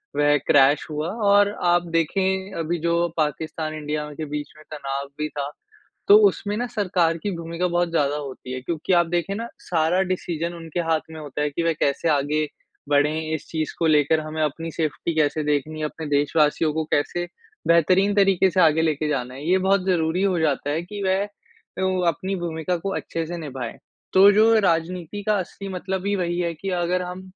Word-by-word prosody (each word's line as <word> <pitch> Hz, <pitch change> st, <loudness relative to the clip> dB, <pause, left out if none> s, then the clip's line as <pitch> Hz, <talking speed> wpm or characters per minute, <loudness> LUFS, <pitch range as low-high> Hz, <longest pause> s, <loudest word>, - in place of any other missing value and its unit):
वह 145 Hz, 0 st, +4 dB
क्रैश 140 Hz, +1 st, +5 dB
हुआ। 150 Hz, +1 st, -3 dB, 0.2 s
और 205 Hz, 0 st, +5 dB, 0.2 s
आप 175 Hz, 0 st, +3 dB
देखें 190 Hz, +4 st, 0 dB
अभी 165 Hz, +2 st, -1 dB
जो 170 Hz, +1 st, +1 dB
पाकिस्तान 155 Hz, +1 st, -2 dB
इंडिया 150 Hz, 0 st, -3 dB
के 155 Hz, -, -3 dB
बीच 150 Hz, 0 st, -5 dB
में 155 Hz, -, -15 dB
तनाव 140 Hz, -2 st, -4 dB
भी 150 Hz, -, 0 dB
था। 140 Hz, -1 st, -4 dB, 0.6 s
तो 410 Hz, -, +9 dB
उसमें 205 Hz, -, -2 dB
ना 245 Hz, -, -1 dB
सरकार 180 Hz, -6 st, +1 dB
की 205 Hz, -, -1 dB
भूमिका 170 Hz, +2 st, -2 dB
बहुत 175 Hz, 0 st, +1 dB
ज़्यादा 145 Hz, -3 st, +1 dB
होती 135 Hz, -3 st, -6 dB
है 130 Hz, -, -4 dB
क्योंकि 165 Hz, +5 st, -2 dB
आप 170 Hz, -1 st, +5 dB
देखें 175 Hz, +3 st, -1 dB
ना 230 Hz, +2 st, -4 dB, 0.2 s
सारा 170 Hz, +2 st, +2 dB
डिसीजन 170 Hz, -1 st, -2 dB
उनके 165 Hz, 0 st, -5 dB
हाथ 160 Hz, -1 st, +3 dB
में 160 Hz, -, -8 dB
होता 150 Hz, -1 st, -5 dB
है 150 Hz, -, +1 dB
कि 165 Hz, +4 st, -3 dB
वे 165 Hz, -1 st, +2 dB
कैसे 150 Hz, +2 st, 0 dB
आगे 150 Hz, +1 st, +1 dB, 0.4 s
बढ़ें 145 Hz, +1 st, +3 dB, 0.2 s
इस 160 Hz, -, -4 dB
चीज़ 155 Hz, -2 st, -2 dB
को 165 Hz, -, +2 dB
लेकर? 155 Hz, +1 st, +3 dB
हमें 155 Hz, 0 st, -4 dB
अपनी 165 Hz, +3 st, -3 dB
सेफ़्टी 155 Hz, +1 st, -2 dB
कैसे 155 Hz, 0 st, +1 dB
देखनी 150 Hz, +1 st, -1 dB
है? 155 Hz, -, -1 dB
अपने 160 Hz, +1 st, -6 dB
देशवासियों 150 Hz, +1 st, +2 dB
को 160 Hz, 0 st, -1 dB
कैसे 175 Hz, +4 st, 0 dB, 0.4 s
बेहतरीन 185 Hz, +5 st, +4 dB
तरीके 195 Hz, -2 st, +4 dB
से 185 Hz, -, +3 dB
आगे 160 Hz, 0 st, +4 dB
लेके 155 Hz, -1 st, 0 dB
जाना 125 Hz, -3 st, -2 dB
है? 140 Hz, +3 st, -8 dB
ये 185 Hz, -, +5 dB
बहुत 190 Hz, 0 st, +2 dB
ज़रूरी 175 Hz, -1 st, +1 dB
हो 185 Hz, -4 st, +2 dB
जाता 145 Hz, -2 st, 0 dB
है 155 Hz, +3 st, 0 dB
कि 205 Hz, +3 st, -7 dB
वह 190 Hz, +2 st, +1 dB, 0.6 s
ओ 185 Hz, -1 st, 0 dB
अपनी 190 Hz, +4 st, -1 dB
भूमिका 170 Hz, 0 st, -2 dB
को 195 Hz, +4 st, -4 dB
अच्छे 165 Hz, -1 st, -3 dB
से 175 Hz, +1 st, -5 dB
निभाएँ। 135 Hz, -7 st, -6 dB, 0.4 s
तो 195 Hz, +2 st, +8 dB
जो 220 Hz, +2 st, +5 dB
राजनीति 175 Hz, +2 st, -1 dB
का 215 Hz, -, +4 dB
असली 195 Hz, +2 st, -6 dB
मतलब 190 Hz, +1 st, -4 dB
ही 205 Hz, -, +1 dB
वही 175 Hz, -1 st, -1 dB
है 170 Hz, -1 st, -1 dB
कि 190 Hz, +5 st, -6 dB
अगर 180 Hz, +1 st, 0 dB
हम 180 Hz, +1 st, -6 dB
165 Hz, 195 wpm, -23 LUFS, 150-180 Hz, 0.6 s, तो